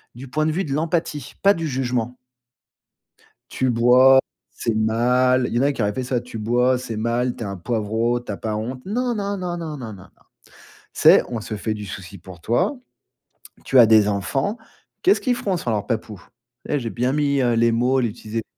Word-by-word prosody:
du 130 Hz, +2 st, -9 dB
point 155 Hz, +3 st, 0 dB
de 155 Hz, -, +1 dB
vue 185 Hz, +5 st, -1 dB
de 140 Hz, -, -3 dB
l'empathie, 155 Hz, -3 st, -2 dB
pas 200 Hz, +1 st, +6 dB
du 165 Hz, -3 st, -3 dB
jugement 125 Hz, -2 st, -2 dB, 1.3 s
«Tu 130 Hz, -1 st, 0 dB
bois, 125 Hz, +3 st, +6 dB, 0.3 s
c'est 115 Hz, -, -3 dB
mal.» 125 Hz, +3 st, +2 dB
Il -, -, -5 dB
y -, -, +2 dB
en 125 Hz, -, +2 dB
a 145 Hz, -, +2 dB
qui 120 Hz, -, -3 dB
auraient 105 Hz, 0 st, 0 dB
fait 130 Hz, -, -3 dB
ça: 125 Hz, -1 st, -1 dB
«Tu 120 Hz, -2 st, -9 dB
bois 125 Hz, +3 st, +2 dB
c'est 115 Hz, -3 st, -6 dB
mal, 120 Hz, +3 st, -1 dB
tu -, -, -8 dB
es -, -, -4 dB
un 100 Hz, 0 st, -5 dB
poivrot, 115 Hz, +4 st, -1 dB
tu 115 Hz, -3 st, -7 dB
as -, -, -5 dB
pas 110 Hz, 0 st, -3 dB
honte?» 125 Hz, +4 st, -5 dB
Non, 240 Hz, +4 st, -1 dB
non, 200 Hz, -1 st, -2 dB
non, 180 Hz, -2 st, -4 dB
non, 160 Hz, -3 st, -5 dB
non, 115 Hz, -5 st, -7 dB
non, -, -, -9 dB
non. 95 Hz, -1 st, -14 dB, 0.6 s
«Tu -, -, -22 dB, 0.2 s
sais? -, -, +6 dB
On 115 Hz, -3 st, -4 dB
se 105 Hz, -, -5 dB
fait 110 Hz, +1 st, -2 dB
du 105 Hz, -1 st, -7 dB
soucis 95 Hz, -1 st, -8 dB
pour 90 Hz, 0 st, -13 dB
toi, 120 Hz, -, 0 dB, 0.9 s
tu 130 Hz, -, +4 dB
as 120 Hz, -, +9 dB
des 110 Hz, -2 st, +5 dB
enfants, 135 Hz, -, -1 dB, 0.4 s
qu'est-ce 390 Hz, +3 st, +3 dB
qu'ils 250 Hz, -2 st, +1 dB
feront 195 Hz, -6 st, -2 dB
sans 120 Hz, -, -3 dB
leur 105 Hz, -2 st, -2 dB
papou?» 110 Hz, -5 st, -4 dB, 0.5 s
et 150 Hz, -, 0 dB
j'ai 115 Hz, -, -4 dB
bien 125 Hz, +3 st, -1 dB
mis, 140 Hz, -2 st, +1 dB
heu, 120 Hz, -2 st, +2 dB
les 115 Hz, 0 st, +3 dB
mots, 125 Hz, +3 st, +2 dB
j'ai 120 Hz, -, 0 dB
utilisé 110 Hz, 0 st, -5 dB
125 Hz, 220 wpm, -22 LUFS, 110-140 Hz, 1.3 s, as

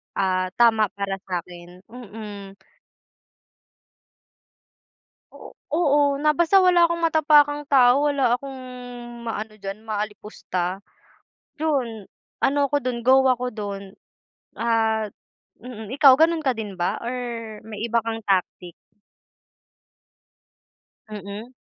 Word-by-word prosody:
ah, 185 Hz, -1 st, 0 dB
tama 225 Hz, -3 st, +4 dB
para 195 Hz, -1 st, -3 dB
sa'kin, 180 Hz, 0 st, -7 dB
mm. 210 Hz, -4 st, -9 dB, 2.8 s
O -, -, -13 dB, 0.2 s
oo 290 Hz, -3 st, +3 dB, 0.2 s
na 305 Hz, -, +4 dB
basta 345 Hz, +3 st, +4 dB
wala 360 Hz, -2 st, +5 dB
'kong 340 Hz, 0 st, 0 dB
matapakang 295 Hz, -2 st, +4 dB
tao, 270 Hz, 0 st, +4 dB
wala 265 Hz, -4 st, +2 dB
akong 270 Hz, 0 st, -9 dB, 0.7 s
maano 220 Hz, -1 st, -4 dB
diyan 195 Hz, 0 st, -7 dB
maalipusta, 205 Hz, -3 st, -4 dB, 0.7 s
'yon. 250 Hz, -10 st, -2 dB, 0.3 s
Ano 285 Hz, +2 st, +2 dB
ako 290 Hz, +1 st, 0 dB
do'n, 250 Hz, -1 st, -2 dB
go 265 Hz, +1 st, +7 dB
ako 250 Hz, 0 st, 0 dB
do'n 200 Hz, -2 st, -5 dB, 0.7 s
at, 220 Hz, -2 st, 0 dB, 0.5 s
mm, 220 Hz, -3 st, -9 dB
ikaw 275 Hz, -3 st, +8 dB
gano'n 320 Hz, +1 st, +2 dB
ka 260 Hz, -, +3 dB
din 210 Hz, -4 st, -6 dB
ba 175 Hz, -, 0 dB
or 240 Hz, +2 st, -3 dB, 0.5 s
may 215 Hz, -2 st, -7 dB
iba 235 Hz, 0 st, 0 dB
kang 225 Hz, 0 st, -3 dB
tactic? 185 Hz, -3 st, -1 dB, 2.4 s
Mm. 210 Hz, +3 st, -8 dB
225 Hz, 105 wpm, -23 LUFS, 200-275 Hz, 2.8 s, ikaw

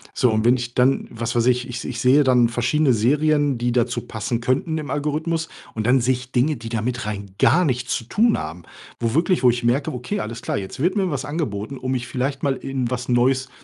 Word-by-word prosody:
So, 125 Hz, -3 st, +3 dB
und 110 Hz, 0 st, 0 dB
wenn 120 Hz, +1 st, +5 dB
ich 120 Hz, -1 st, -5 dB
dann, 130 Hz, +2 st, +2 dB
was 115 Hz, +1 st, -4 dB
weiß 120 Hz, -, +2 dB
ich 125 Hz, 0 st, +2 dB
ich 125 Hz, 0 st, -6 dB
ich 120 Hz, -2 st, -4 dB
sehe 135 Hz, +3 st, +5 dB
dann 125 Hz, -3 st, +4 dB
verschiedene 125 Hz, +4 st, +2 dB
Serien, 145 Hz, +4 st, +2 dB
die 120 Hz, 0 st, 0 dB
dazu 120 Hz, 0 st, 0 dB
passen 110 Hz, +2 st, -3 dB
könnten 130 Hz, +6 st, 0 dB
im 150 Hz, -, -6 dB
Algorithmus 155 Hz, +3 st, -1 dB, 0.3 s
und 110 Hz, -1 st, -2 dB
dann 130 Hz, +1 st, +4 dB
sehe 125 Hz, +2 st, +2 dB
ich 125 Hz, 0 st, -10 dB
Dinge, 135 Hz, +4 st, +1 dB
die 115 Hz, 0 st, -8 dB
damit 120 Hz, +1 st, -2 dB
rein 100 Hz, -2 st, -5 dB
gar 180 Hz, +2 st, +4 dB
nichts 125 Hz, -3 st, -1 dB
zu 115 Hz, -, -5 dB
tun 220 Hz, -, +2 dB
haben. 80 Hz, +3 st, -6 dB, 0.4 s
Wo 115 Hz, -1 st, -1 dB
wirklich 170 Hz, +2 st, +2 dB
wo 125 Hz, -, +7 dB
ich 120 Hz, 0 st, -4 dB
merke, 135 Hz, +6 st, +1 dB
okay, 125 Hz, +12 st, -3 dB
alles 115 Hz, +2 st, -6 dB
klar, -, -, -2 dB
jetzt 100 Hz, +6 st, -6 dB
wird 175 Hz, +8 st, +1 dB
mir 190 Hz, -5 st, 0 dB
was 135 Hz, -2 st, -3 dB
angeboten, 135 Hz, -5 st, -4 dB
um 130 Hz, 0 st, -4 dB
mich 125 Hz, -1 st, -2 dB
vielleicht 135 Hz, +2 st, -2 dB
mal 140 Hz, -2 st, +1 dB
in 130 Hz, -2 st, -3 dB
was 125 Hz, 0 st, -4 dB
Neues 130 Hz, +2 st, +2 dB
125 Hz, 235 wpm, -22 LUFS, 120-145 Hz, 0.4 s, wo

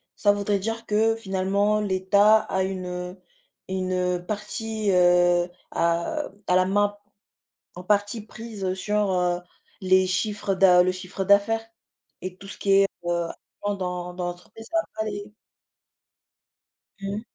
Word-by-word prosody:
ça 205 Hz, -, +4 dB
voudrait 205 Hz, 0 st, 0 dB
dire 225 Hz, +3 st, -4 dB
que 220 Hz, +2 st, +2 dB
finalement 200 Hz, 0 st, 0 dB
l'État 200 Hz, +2 st, +4 dB
a 190 Hz, -3 st, -1 dB
une, 185 Hz, -1 st, -3 dB
heu, 180 Hz, +1 st, -6 dB, 0.5 s
une 185 Hz, -1 st, -1 dB
partie, 215 Hz, +1 st, -2 dB
heu, 175 Hz, -1 st, +4 dB, 0.2 s
a 170 Hz, -, 0 dB, 0.2 s
a 180 Hz, -, +3 dB
la 185 Hz, -, +4 dB
main, 205 Hz, +2 st, +1 dB, 0.8 s
en 180 Hz, -, -8 dB
partie 205 Hz, +3 st, +1 dB
prise 210 Hz, -4 st, -5 dB
sur, 210 Hz, +1 st, 0 dB
heu, 180 Hz, -1 st, +1 dB, 0.4 s
les 185 Hz, 0 st, +4 dB
chiffres 195 Hz, +1 st, -1 dB
d'a 180 Hz, -1 st, +6 dB
le 185 Hz, +1 st, +1 dB
chiffre 185 Hz, +1 st, -5 dB
d'affaires 205 Hz, +3 st, +3 dB, 0.6 s
et 185 Hz, 0 st, -5 dB
que -, -, -30 dB
tout 195 Hz, -, -11 dB
ce -, -, -8 dB
qui 200 Hz, -, +1 dB
est, 195 Hz, 0 st, +6 dB, 0.2 s
heu, 170 Hz, -1 st, 0 dB, 0.4 s
en 205 Hz, 0 st, 0 dB
dans 180 Hz, -2 st, -4 dB
dans 180 Hz, 0 st, -3 dB
l'entreprise 175 Hz, +5 st, -9 dB
ça 335 Hz, -, +1 dB
va -, -, -9 dB
pas 220 Hz, -, -2 dB
aller. 205 Hz, -1 st, -6 dB, 1.7 s
Mmh. 200 Hz, +2 st, -3 dB
195 Hz, 150 wpm, -25 LUFS, 180-210 Hz, 1.7 s, d'a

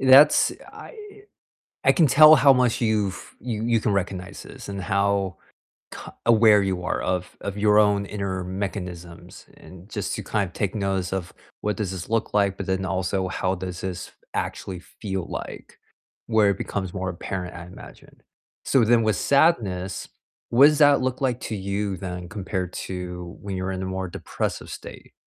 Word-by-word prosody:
that's 135 Hz, +3 st, +7 dB, 0.2 s
I -, -, -11 dB, 0.9 s
I -, -, +6 dB
can 165 Hz, -4 st, +4 dB
tell 155 Hz, +3 st, +9 dB
how 140 Hz, -2 st, +7 dB
much 125 Hz, -3 st, +2 dB
you've 105 Hz, -5 st, -1 dB
you 110 Hz, -2 st, -4 dB
you 115 Hz, -1 st, +2 dB
can 105 Hz, -, 0 dB
recognize 95 Hz, -2 st, -3 dB
this -, -, -11 dB
and 100 Hz, -1 st, -4 dB
how 100 Hz, -1 st, 0 dB, 0.6 s
c -, -, -8 dB, 0.3 s
aware 110 Hz, -3 st, +6 dB
you 95 Hz, -2 st, -1 dB
are -, -, -1 dB
of 90 Hz, -1 st, -2 dB
of 100 Hz, 0 st, -5 dB
your 105 Hz, 0 st, +4 dB
own 100 Hz, -1 st, +3 dB
inner 95 Hz, -3 st, -3 dB
mechanisms 90 Hz, -3 st, -6 dB
and 90 Hz, +1 st, -14 dB
just 100 Hz, -3 st, -3 dB
to -, -, -5 dB
kind 105 Hz, -3 st, -1 dB
of 90 Hz, -, -12 dB
take 100 Hz, +1 st, -2 dB
notice 95 Hz, -3 st, -1 dB
of 90 Hz, -2 st, -3 dB, 0.3 s
what 105 Hz, 0 st, -1 dB
does 100 Hz, -4 st, -2 dB
this 90 Hz, -3 st, -6 dB
look 115 Hz, -1 st, -1 dB
like, 100 Hz, -2 st, +2 dB
but 95 Hz, -, -5 dB
then 95 Hz, 0 st, -1 dB
also 95 Hz, 0 st, -1 dB
how 95 Hz, +1 st, -1 dB
does 90 Hz, -1 st, -6 dB
this 90 Hz, -2 st, -5 dB, 0.2 s
actually 90 Hz, -2 st, -4 dB
feel 95 Hz, -1 st, -5 dB
like, -, -, -8 dB, 0.5 s
where 110 Hz, -3 st, +4 dB
it 100 Hz, -, -2 dB
becomes 95 Hz, -3 st, -3 dB
more 95 Hz, 0 st, -3 dB
apparent, 90 Hz, +1 st, -5 dB
I 85 Hz, -1 st, -8 dB
imagine, 90 Hz, -, -14 dB, 0.4 s
so 125 Hz, -4 st, +3 dB
then 115 Hz, +1 st, +4 dB
with 110 Hz, -1 st, +1 dB
sadness, 105 Hz, -, +1 dB, 0.4 s
what 130 Hz, +4 st, +7 dB
does 150 Hz, -1 st, +3 dB
that 145 Hz, -2 st, +6 dB
look 130 Hz, 0 st, -2 dB
like 125 Hz, -2 st, 0 dB
to 110 Hz, -, -3 dB
you 100 Hz, 0 st, -2 dB
then 90 Hz, -2 st, -6 dB
compared 95 Hz, -3 st, -4 dB
to 90 Hz, -2 st, -6 dB
when 100 Hz, -2 st, -5 dB
you're 95 Hz, +1 st, -2 dB
in 95 Hz, 0 st, -4 dB
a -, -, -3 dB
more 95 Hz, 0 st, -3 dB
depressive -, -, -4 dB
state? -, -, -10 dB
100 Hz, 180 wpm, -24 LUFS, 95-110 Hz, 0.9 s, tell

